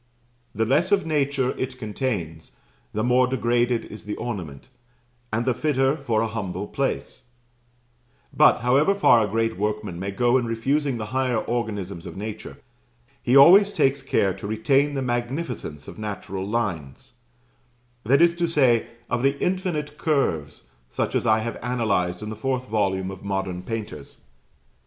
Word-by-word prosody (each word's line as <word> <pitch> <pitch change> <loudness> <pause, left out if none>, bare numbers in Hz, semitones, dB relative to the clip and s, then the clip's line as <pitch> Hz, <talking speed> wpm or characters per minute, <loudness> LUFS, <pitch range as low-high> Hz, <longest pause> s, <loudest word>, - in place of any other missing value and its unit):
The 110 +2 +1
less 155 - +2
of 200 -3 +3
nature 140 -4 0
it 130 0 -3
contains, 105 - -4 0.4
the 110 - -2
more 125 +1 +3
degraded 120 -1 +1
is 105 - -11
the 105 - -4
ornament, 90 - -6 0.6
and 115 +2 -1
the 130 - +2
fitter 135 0 +1
for 115 -8 -1
a - - 0
humble 100 -3 -4
place; 135 0 -3 1.1
but, - - +5
however 140 +11 +3
far 120 - +5
a 105 - -2
great 115 +1 0
workman 105 -3 -3
may 95 +2 -3
go 120 +5 +2
in 120 - -3
refusing 135 +4 0
the 110 - -4
higher 130 -2 +1
organisms 105 -6 -3
of - - -9
nature, 110 +1 -7 0.6
he 125 +3 +4
always 195 +8 +8
takes 135 -6 +1
care 100 -8 +1
to 100 - -7
retain 135 +7 +1
the 135 - -1
magnificence 120 - -3
of - - -10
natural 100 -2 -5
lines; 105 - -3 0.9
that 140 +9 +4
is 170 0 +5
to 170 0 +1
say, 130 -8 +3 0.2
of 120 - -1
the 135 +1 +2
infinite 170 -5 -2
curves, 110 - -1 0.3
such - - -2
as - - 0
I 110 0 +4
have 115 0 -4
analyzed 110 -7 -1
in 105 - -5
the - - -5
fourth 130 +3 -2
volume 95 -3 0
of 95 - -10
"Modern 95 -2 -3
Painters." 105 -8 -6
120 Hz, 155 wpm, -24 LUFS, 105-135 Hz, 1.1 s, always